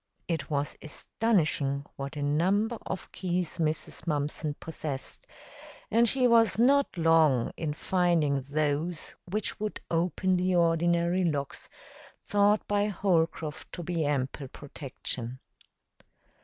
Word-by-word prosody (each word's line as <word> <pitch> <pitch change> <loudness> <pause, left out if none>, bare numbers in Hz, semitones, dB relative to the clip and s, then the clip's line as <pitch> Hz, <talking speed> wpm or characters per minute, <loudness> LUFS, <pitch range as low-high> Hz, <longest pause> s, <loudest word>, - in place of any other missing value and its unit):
It 165 -4 -2
was 145 -1 -1
astonishing 155 -6 0
what 140 +2 -6
a 145 - -3
number 195 +10 +1
of 190 - -5
keys 180 -2 -2
Mrs. 155 +1 -2
Mumpson 150 0 -1
possessed, 150 -4 -6 0.6
and 230 +1 +5
she 260 +1 +3
was 230 -2 +4
not 270 0 +3
long 160 -7 +4
in 150 -2 -3
finding 165 -6 +1
those 150 +4 -2
which 210 +2 -2
would 215 0 -3
open 180 +2 +1
the 185 0 +1
ordinary 170 +1 +2
locks 145 -5 -2 0.6
thought 205 +1 +3
by 205 0 +2
Holcroft 165 -6 -1
to 175 - -5
be 170 -1 -1
ample 140 -1 -1
protection. 130 -3 -6
165 Hz, 115 wpm, -29 LUFS, 145-185 Hz, 0.6 s, and